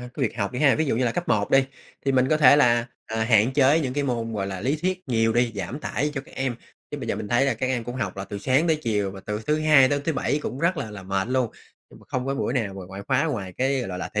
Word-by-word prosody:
h 125 - -7
của 145 - -3
việc 120 -2 -1
học 100 -2 -1
đi 125 - -4
ha. 140 -3 +5
Ví 160 - +1
dụ 135 - 0
như 125 - +1
là 115 - +1
cấp 175 - -3
1 105 -1 +1
đi, 135 0 +5 0.4
thì 135 - +2
mình 130 0 +3
có 155 - +3
thể 145 -2 +7
là, 120 -4 +3 0.2
à, 110 0 -2
hạn 115 +1 +4
chế 140 +3 +4
những 130 -4 -3
cái 145 0 0
môn, 115 -3 -2
gọi 100 -2 -2
là, 95 -1 -5
lý 135 +8 0
thuyết 185 +3 -1
nhiều 115 -2 +2
đi, 120 0 +1
giảm 100 +9 -5
tải 150 +1 -1
cho 135 - -2
các 135 - -17
em, 130 -2 -2 0.4
chứ 145 - -5
bây 125 -4 -6
giờ 100 - -1
mình 105 -1 -5
thấy 120 +4 +3
là 135 - +1
các 120 +4 -2
em 125 -3 -1
cũng 120 - -6
học 100 -7 -3
là 95 - -4
từ 100 0 -6
sáng 130 +10 +2
tới 160 -2 +3
chiều 105 -4 0
và 95 0 -10
từ 105 0 -3
thứ 150 +1 +2
Hai 150 -4 +6
đến 145 0 0
thứ 165 - 0
Bảy 145 +1 0
cũng 130 - -4
rất 170 +4 +1
là 130 -7 -4
là 105 -2 -9
mệt 95 +2 -2
luôn. 130 -3 0 0.4
Nhưng - - -16
mà - - -18
không 130 0 -2
có 135 - -1
buổi 135 - -1
nào 110 -7 -1
mà 95 - -7
ngoại 95 +1 -8
khóa 135 +2 +2
ngoài 105 - -3
cái, 135 +1 +1
gọi 120 - -4
là 90 - -4
là, 90 - -4
thể 105 - +1
125 Hz, 330 wpm, -24 LUFS, 110-140 Hz, 0.4 s, thể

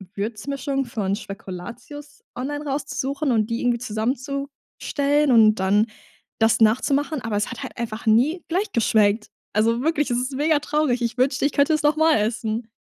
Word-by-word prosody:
Würzmischung 270 +6 -3
von 200 -4 -2
Spekulatius 235 +9 -9
online 290 +4 -4
rauszusuchen 275 0 -2
und 220 -1 +1
die 230 - -2
irgendwie 245 -1 +1
zusammenzustellen 275 +4 -1
und 220 -2 +6
dann 200 +2 +2 0.5
das 225 0 +3
nachzumachen, 275 +6 +2
aber 220 -2 -2
es 210 - -1
hat - - -7
halt 260 - -8
einfach 230 -1 -5
nie 260 +11 +3
gleich 375 +6 -1
geschmeckt. 215 -1 +2 0.3
Also 230 +3 +2
wirklich, 295 -3 0
es 240 - +1
ist 255 +2 -3
mega 300 +2 +2
traurig. 295 -4 0
Ich 235 +1 -2
wünschte, 260 +2 +1
ich 285 - +1
könnte 285 +3 +3
es 310 - 0
noch 295 +1 +3
mal 315 -2 +4
essen. 220 +1 -2
250 Hz, 165 wpm, -23 LUFS, 220-285 Hz, 0.5 s, und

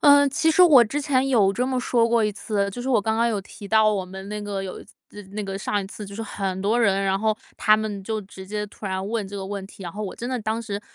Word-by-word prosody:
呃， 285 -1 +7
其 315 +3 +2
实 340 +3 +6
我 295 -8 +8
之 235 +6 -2
前 270 -3 +1
有 210 -7 +4
这 250 +5 -1
么 260 -1 0
说 240 -2 +2
过 230 -2 +3
一 210 - 0
次。 200 0 -1
就 245 - -7
是 255 - -4
我 250 -5 +4
刚 220 +2 0
刚 235 +1 +3
有 220 -3 0
提 200 +1 -11
到 220 -1 +4
我 195 -3 -1
们 190 +1 -9
那 210 - -4
个 205 -2 -4
有 185 - -6
一 - - -12
次 - - -21 0.4
那 210 0 -3
个 195 0 -4
上 205 +1 -1
一 190 - -7
次 210 +1 -8
就 200 - -9
是 225 - -4
很 195 -3 -3
多 225 +4 +2
人， 195 -3 +3
然 195 0 +1
后 215 0 +1 0.2
他 215 0 +5
们 215 -2 -3
就 220 +2 -2
直 190 -1 -11
接 210 +1 -3
突 205 0 -9
然 190 0 -2
问 220 -2 -2
这 200 - -7
个 195 - -4
问 195 0 -5
题， 195 - -13
然 170 -2 -6
后 210 - -5
我 195 - -5
真 240 - -5
的 255 -1 -1
当 220 +1 -2
时， 205 -3 -4
210 Hz, 325 characters per minute, -24 LUFS, 195-235 Hz, 0.4 s, 我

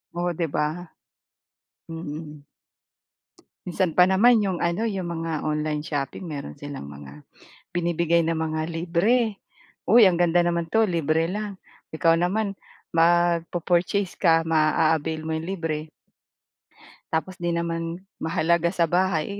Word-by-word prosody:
Oh 175 0 -1
'di 165 0 -2
ba? 155 +4 -2 1.0
Mm. 150 -2 -7 1.2
Minsan 180 0 0
pa 180 +3 +5
naman 220 +5 +5
'yong 190 -4 -1
ano, 175 +7 0
'yong 195 -4 -3 0.2
mga 165 - -2
online 150 0 -1
shopping 145 +1 -4
meron 145 - -6
silang 145 - -8
mga 70 0 -11 0.5
binibigay 170 -1 +1
na 165 - +1
mga 160 -1 -2
libre. 180 +7 +1 0.5
Uy 235 +4 +7
ang 185 -4 +5
ganda 175 0 +3
naman 170 -1 0
'to 225 +7 +2
libre 165 -4 +1
lang, 210 +1 -4 0.4
ikaw 165 +1 +3
naman 195 +3 -1 0.3
mag-po-purchase 175 +2 +1
ka 165 -3 +4
ma-a-avail 160 0 +1
mo 160 - -5
iyong 160 - -6
libre 160 -4 -3 1.2
tapos 180 +3 -2
hindi 175 -1 -1
naman 165 +1 -3 0.2
mahalaga 170 +1 +1
sa 175 -2 +1
bahay, 185 +2 0
170 Hz, 125 wpm, -24 LUFS, 160-180 Hz, 1.2 s, Uy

